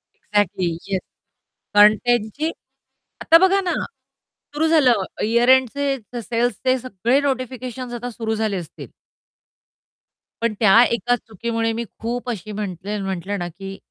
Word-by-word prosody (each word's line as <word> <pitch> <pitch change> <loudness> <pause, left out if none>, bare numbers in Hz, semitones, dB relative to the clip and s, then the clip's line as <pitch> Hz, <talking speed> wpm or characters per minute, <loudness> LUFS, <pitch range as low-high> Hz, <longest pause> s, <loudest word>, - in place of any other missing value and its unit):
Exactly 200 -3 0 0.2
yes, 190 - +1 0.8
कंटेंटची 220 +7 +3 0.7
आता 330 - +7
बघा 390 +1 +2
ना, 360 - -1 0.8
सुरु 320 +2 +2
झालं, 255 -11 +4 0.2
ईअर 235 +3 +2
एंडचे, 270 +2 +3 0.2
सेल्सचे, 245 +3 0
सगळे 245 +2 0
नोटिफिकेशन्स 255 -2 -4
आता 245 +1 -5
सुरु 220 -1 -3
झाले 215 -3 -1
असतील. 170 -3 -8 1.5
पण 230 -2 +1
त्या 225 +2 +7
एका 245 +1 +1
चुकीमुळे 225 +1 -3
मी 235 - -3 0.2
खूप 245 +2 -4
अशी 215 -2 -5
म्हटले 205 0 -4
म्हटलं 195 +1 -3
ना 175 - -3
की 195 +3 -9
230 Hz, 120 wpm, -21 LUFS, 205-255 Hz, 1.5 s, आता